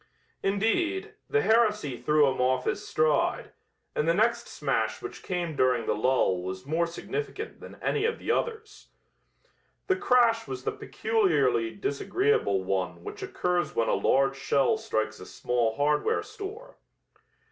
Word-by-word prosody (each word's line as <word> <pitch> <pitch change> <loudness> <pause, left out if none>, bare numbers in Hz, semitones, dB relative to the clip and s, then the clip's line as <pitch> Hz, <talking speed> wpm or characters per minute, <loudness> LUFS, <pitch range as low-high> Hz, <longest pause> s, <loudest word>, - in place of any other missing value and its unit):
Indeed, 225 - 0 0.2
the 435 0 +2
heresy 210 - +2
threw 150 +5 +3
him 130 -1 0
off 130 0 +1
his - - -2
stride, 155 -2 +1 0.4
and 150 - 0
the 165 - +3
next 225 +4 +2
smash - - -1
which 390 - -8
came 175 -4 -3
during 125 -3 +2
the - - +1
lull 110 -6 +2
was 95 +1 -6
more 165 +3 +1
significant 165 - -5
than - - -11
any 430 - +1
of 460 0 0
the - - -2
others. 440 -2 -3 1.0
The 380 - +2
crash 245 - +3
was 130 -1 -6
the - - 0
peculiarly 140 - +1
disagreeable 140 - 0
one 90 -2 -2
which - - -8
occurs 180 -1 -1
when 115 - +1
a - - +2
large 135 0 +2
shell 140 +9 +2
strikes 110 - -2
a 90 - -9
small 115 +4 -1
hardware 150 +2 +1
store. 435 +5 -9
150 Hz, 145 wpm, -28 LUFS, -, 1.0 s, threw